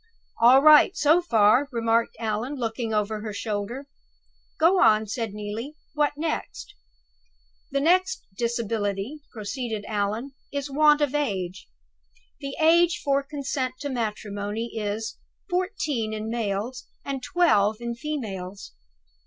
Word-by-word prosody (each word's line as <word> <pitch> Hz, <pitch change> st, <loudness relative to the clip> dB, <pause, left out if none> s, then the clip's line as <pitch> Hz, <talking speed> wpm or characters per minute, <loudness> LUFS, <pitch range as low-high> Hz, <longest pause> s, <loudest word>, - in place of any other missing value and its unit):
"All 255 Hz, +4 st, +7 dB
right, 305 Hz, +5 st, +7 dB
so 310 Hz, +4 st, +4 dB
far," 235 Hz, -2 st, +4 dB
remarked 230 Hz, -1 st, +1 dB
Allan, 225 Hz, +5 st, -2 dB
looking 230 Hz, -2 st, -3 dB
over 210 Hz, 0 st, -1 dB
her 215 Hz, -1 st, -5 dB
shoulder. 215 Hz, +6 st, -4 dB, 0.7 s
"Go 355 Hz, +4 st, +5 dB
on," 220 Hz, -1 st, +5 dB
said 225 Hz, 0 st, -3 dB
Neelie. 210 Hz, +7 st, -6 dB, 0.2 s
"What 295 Hz, -1 st, +1 dB
next?" 315 Hz, +1 st, -4 dB, 1.0 s
"'The 275 Hz, 0 st, 0 dB
next 370 Hz, +8 st, +2 dB
disability,'" 225 Hz, +1 st, -2 dB
proceeded 220 Hz, -1 st, -4 dB
Allan, 215 Hz, +5 st, -2 dB, 0.2 s
"'is 280 Hz, 0 st, -4 dB
want 300 Hz, +1 st, +5 dB
of 290 Hz, -2 st, +1 dB
age. 195 Hz, -11 st, -2 dB, 0.7 s
The 275 Hz, -1 st, -5 dB
age 335 Hz, +2 st, +4 dB
for 280 Hz, 0 st, +3 dB
consent 275 Hz, -2 st, -3 dB
to 285 Hz, -, -3 dB
matrimony 215 Hz, -2 st, -3 dB
is, 215 Hz, 0 st, -3 dB, 0.3 s
fourteen 355 Hz, -, -1 dB
in 215 Hz, +1 st, -4 dB
males, 230 Hz, +2 st, -3 dB, 0.2 s
and 275 Hz, -1 st, -3 dB
twelve 220 Hz, -, +3 dB
in 235 Hz, 0 st, -3 dB
females. 210 Hz, -8 st, -6 dB
235 Hz, 120 wpm, -25 LUFS, 215-290 Hz, 1.0 s, All